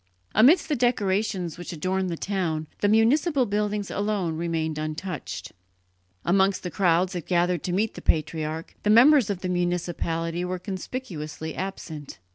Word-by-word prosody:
Amidst 260 - +6
the 305 - +1
decorations 200 - 0
which 175 - -6
adorned 185 +3 -1
the 170 - -3
town, 170 -6 -2
the 205 - +2
municipal 255 +7 +3
buildings 205 -1 -1
alone 200 -5 -1
remained 160 -2 -2
untouched; 155 +4 -5 0.7
amongst 190 +2 +2
the 180 - -4
crowds 180 -1 +2
that 175 -4 -5
gathered 175 -2 +2
to 180 - -1
meet 205 +5 0
the - - -9
patriarch, 155 +1 -1
the 210 - 0
members 245 +2 +7
of 195 -3 -2
the 185 - -2
municipality 175 -1 -1
were 180 +1 -2
conspicuously 180 -5 -6
absent. 160 -6 -6
185 Hz, 145 wpm, -25 LUFS, 165-205 Hz, 0.7 s, members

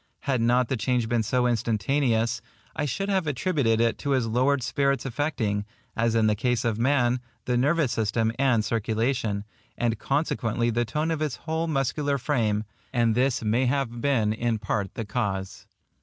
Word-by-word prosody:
Had 130 -4 0
not 120 +1 +3
the 135 - -1
change 125 0 0
been 120 0 +1
so 125 +3 +1
instantaneous, 115 +1 +1 0.3
I 145 - -1
should 195 +8 -2
have 190 -4 0
attributed 135 -5 +1
it 115 0 +1
to 140 - -3
his 125 - 0
lowered 130 +4 +1
spirits 140 +1 0
affecting, 125 -6 -1 0.3
as 115 0 +1
in 110 -1 +3
the 105 - +4
case 120 +2 0
of 115 -2 0
man, 125 -1 +2 0.3
the 125 - 0
nervous 145 +2 +2
system 110 +1 0
and 125 -6 +3
circulation, 110 -1 -1 0.3
and 115 -3 0
consequently 120 -5 0
the 120 +1 0
tone 150 +8 -1
of 160 - -1
his 150 -4 -1
whole 160 +1 -1
muscular 140 -1 0
frame; 115 -6 0 0.3
and 120 -3 +2
this 125 +1 +1
may 115 +4 +2
have 125 -3 -1
been 115 -7 +2
in 115 0 0
part 100 -2 -2
the 115 - -4
cause. 100 -3 -3
120 Hz, 170 wpm, -26 LUFS, 115-140 Hz, 0.3 s, the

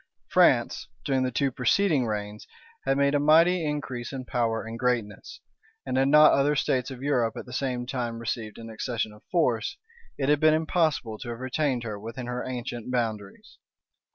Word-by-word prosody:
France, - - +3 0.2
during 135 -2 +1
the 130 - +1
two 135 +2 0
preceding 135 +2 +2
reigns, 105 0 -5 0.4
had 135 - +2
made 140 0 +3
a 145 - +3
mighty 165 +4 +5
increase 135 -5 -4
in 130 -2 -6
power 115 -3 -1
and 115 +1 -7
greatness; 125 - -2 0.4
and - - -2
had 135 +1 +3
not 150 +2 +7
other 145 +2 +3
states 130 -2 0
of 130 -1 -8
Europe 125 -6 +1
at - - -6
the 125 - -11
same 125 -2 -2
time 120 -2 -3
received 115 -2 -4
an 115 - -9
accession 110 -1 -3
of 105 - -16
force, 125 -11 0 0.4
it 135 - -1
had 150 0 +3
been 155 0 +5
impossible 155 - 0
to 125 - -7
have 120 0 -5
retained 130 -1 -1
her 105 -3 -5
within 115 +4 -7
her 125 0 -3
ancient 120 -2 -5
boundaries. 110 -5 -4
125 Hz, 180 wpm, -26 LUFS, 115-140 Hz, 0.4 s, not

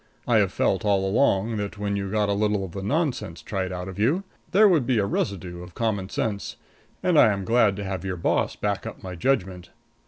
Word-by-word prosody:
I - - +4
have - - +3
felt - - +1
all 100 -2 +2
along 110 0 +2
that 105 +1 -4
when 100 0 -2
you 100 -1 -3
got 105 0 +1
a 100 - +1
little 105 -1 0
of 90 - -9
the 95 - -6
nonsense 120 - -2
tried 95 -2 -3
out 90 0 -5
of 95 +1 -8
you 145 - +2 0.3
there 210 +3 +6
would 160 -10 +3
be 130 -3 +2
a 100 - +2
residue 90 -3 -3
of 90 0 -11
common 100 -5 -1
sense, 100 -4 -3 0.5
and 175 -4 +4
I 110 - +7
am 100 -1 -3
glad 115 -3 +3
to 100 - -5
have 95 -1 -4
your 95 -1 -3
boss 85 - 0
back - - -2
up - - -9
my 90 -1 -6
judgment. 90 -3 -1
100 Hz, 225 wpm, -25 LUFS, 95-110 Hz, 0.5 s, I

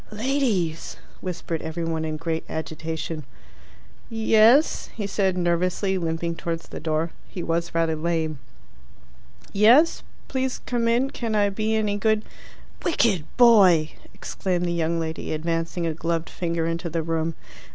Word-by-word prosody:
"Ladies!" 215 - -1 0.2
whispered 175 -3 -4
every 160 +1 -4
one 160 -1 -2
in 155 -1 -3
great 165 0 -2
agitation. 160 +1 -4 0.9
"Yes?" 225 +5 +4
he 210 - -3
said 195 -2 0
nervously, 180 +2 +1
limping 170 -1 -2
towards 165 0 -4
the - - -6
door 160 +1 -1 0.2
(he 175 - -6
was 170 +1 -2
rather 165 -1 +2
lame). 160 -2 -1 1.1
"Yes? 235 +11 +5 0.3
Please 260 -1 -1
come 240 -2 0
in. 245 +4 +2
Can 225 -3 -3
I 205 -1 +3
be 215 +2 0
any 210 -2 0
good 215 +1 +2 0.3
" - - -23
"Wicked 215 - +2
boy!" 195 -10 +6 0.2
exclaimed 180 -2 -2
the 175 - 0
young 170 0 0
lady, 160 -1 -3
advancing 165 +2 -2
a 165 - 0
gloved 165 +1 -2
finger 170 -2 -2
into 165 +1 -2
the 165 0 -2
room. 165 0 -1
170 Hz, 140 wpm, -24 LUFS, 165-215 Hz, 1.1 s, boy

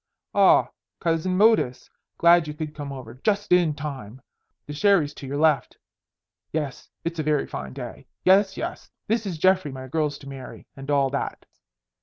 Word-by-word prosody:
Ah, - - +5 0.3
Cousin 170 +2 0
Modus, 210 - +3 0.3
glad 170 -1 +5
you 150 - -5
could 155 -1 -5
come 145 -2 -6
over. 130 -4 -8
Just 205 -2 0
in 175 -4 +4
time. 135 -6 -7 0.5
The 145 - -7
sherry's 160 -3 +3
to 140 - -9
your 140 +2 -3
left. 155 -2 +2 0.7
Yes, 150 -4 -4 0.2
it's 170 -1 -3
a - - 0
very 150 -1 +1
fine 65 -1 -6
day. - - -8 0.2
Yes, 195 +1 +4
yes, - - -5 0.2
this 220 -1 0
is 175 -4 -3
Geoffrey 185 -2 +3
my 130 0 -8
girl's 150 +1 -1
to 140 - -13
marry 135 -2 -9
and 135 +1 -9
all 140 -2 +2
that. 140 - -4
150 Hz, 170 wpm, -25 LUFS, 140-180 Hz, 0.7 s, Ah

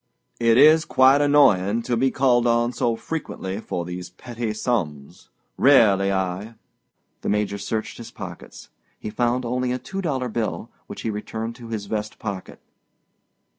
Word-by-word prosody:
"It 115 -1 +4
is 155 +3 +7
quite 135 0 +4
annoying 115 -7 +4
to 120 - -1
be 130 +3 +2
called 125 -3 +2
on 120 +1 +2
so 115 -1 0
frequently 110 -9 -5
for 85 -5 -4
these 90 0 -6
petty 115 +4 -5
sums, 90 - -3 0.3
Really, 100 -8 +5
I—" 95 +4 -3 0.7
The - - -3
Major 105 -1 -1
searched 110 +3 -4
his 115 -1 -8
pockets. - - -10 0.3
He 105 - -7
found 120 +3 0
only 125 +1 -1
a 125 - -1
two 195 +9 -6
dollar 135 -8 -1
bill, 110 -2 -3 0.2
which - - -8
he 110 - -1
returned 110 +2 -5
to 120 - -10
his 110 -3 -4
vest 105 +1 -4
pocket. 100 -4 -6
115 Hz, 155 wpm, -23 LUFS, 100-125 Hz, 0.7 s, is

